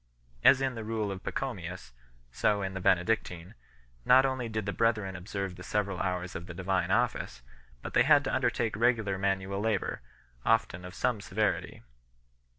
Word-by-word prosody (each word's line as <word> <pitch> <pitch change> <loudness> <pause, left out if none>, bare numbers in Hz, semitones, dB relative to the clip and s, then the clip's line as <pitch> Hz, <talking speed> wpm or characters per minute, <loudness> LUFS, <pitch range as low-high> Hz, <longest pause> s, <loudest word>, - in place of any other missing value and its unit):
As 135 0 +7
in 135 -1 0
the 115 -2 -6
Rule 110 -2 -2
of 95 -1 -6
Pacho 135 -2 -2
mius, 90 - -8 0.4
so 100 - +1
in 95 0 -3
the 95 - -5
Benedictine, 90 -2 +1 0.5
not 130 +2 +6
only 130 -3 -1
did 110 -2 -3
the 100 - -2
brethren 110 -4 +1
observe 95 0 -4
the - - -10
several 100 -1 -1
hours 90 -1 -2
of 85 +1 -6
the 90 - -8
Divine 95 +1 0
Office, - - 0 0.4
but - - -6
they - - +5
had - - +5
to - - -2
undertake 115 -3 0
regular 110 -4 +1
manual 95 0 -1
labour, 105 - -1 0.4
often 110 -5 +1
of 90 +1 -9
some 120 -5 0
severity. 105 - -1
100 Hz, 170 wpm, -30 LUFS, 90-115 Hz, 0.5 s, As